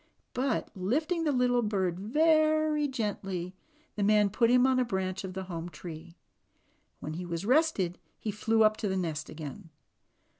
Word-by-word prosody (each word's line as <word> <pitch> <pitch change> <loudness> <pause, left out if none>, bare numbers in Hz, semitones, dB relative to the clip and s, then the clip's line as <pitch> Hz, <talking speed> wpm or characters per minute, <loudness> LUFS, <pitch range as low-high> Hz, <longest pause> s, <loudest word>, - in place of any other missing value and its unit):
But, 255 -1 -1
lifting 310 - 0
the 300 - +2
little 250 -2 +2
bird 190 -5 -1
very 310 +5 +3
gently, 195 -7 -3 0.4
the 210 - -3
man 210 0 +4
put 230 +3 +3
him 250 +1 +5
on 260 -1 +3
a - - +3
branch 190 -4 -2
of 185 -1 -6
the 190 - -3
home 175 -2 -6
tree. 165 +1 -10 0.8
When 155 - -5
he 175 +3 -5
was 170 +2 -4
rested 250 - +2 0.2
he 215 - -3
flew 220 +2 +2
up 215 0 +4
to 215 - -2
the 190 -1 -1
nest 160 -4 -3
again. 160 +4 -8
210 Hz, 165 wpm, -29 LUFS, 180-255 Hz, 0.8 s, him